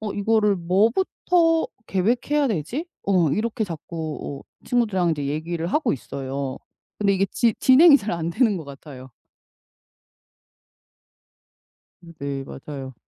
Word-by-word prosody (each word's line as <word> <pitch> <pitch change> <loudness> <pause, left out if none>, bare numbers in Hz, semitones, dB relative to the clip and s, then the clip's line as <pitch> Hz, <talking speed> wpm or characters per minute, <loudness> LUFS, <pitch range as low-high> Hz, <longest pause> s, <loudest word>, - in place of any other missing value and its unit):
어 215 -2 -4
이거를 210 0 +2
"뭐부터 320 - +2 0.2
계획해야 245 +9 +1
되지?" 220 - -3 0.2
어 180 -6 +3
이렇게 220 - -1
자꾸 160 -4 -6
어 - - -29
친구들이랑 205 -8 +1
이제 145 -3 -2
얘기를 165 +3 -3
하고 285 - +1
있어요. 135 0 -5 0.4
근데 200 -1 +2
이게 195 +1 +2
지 230 -3 +2
진행이 285 +3 +7
잘 215 -4 -4
안 170 -1 -2
되는 215 +1 +2
것 160 - -8
같아요. 135 -2 -11 2.9
음 170 -1 -14
네. 140 -1 -4
맞아요. 135 -1 -8
185 Hz, 255 characters per minute, -23 LUFS, 150-230 Hz, 2.9 s, 진행이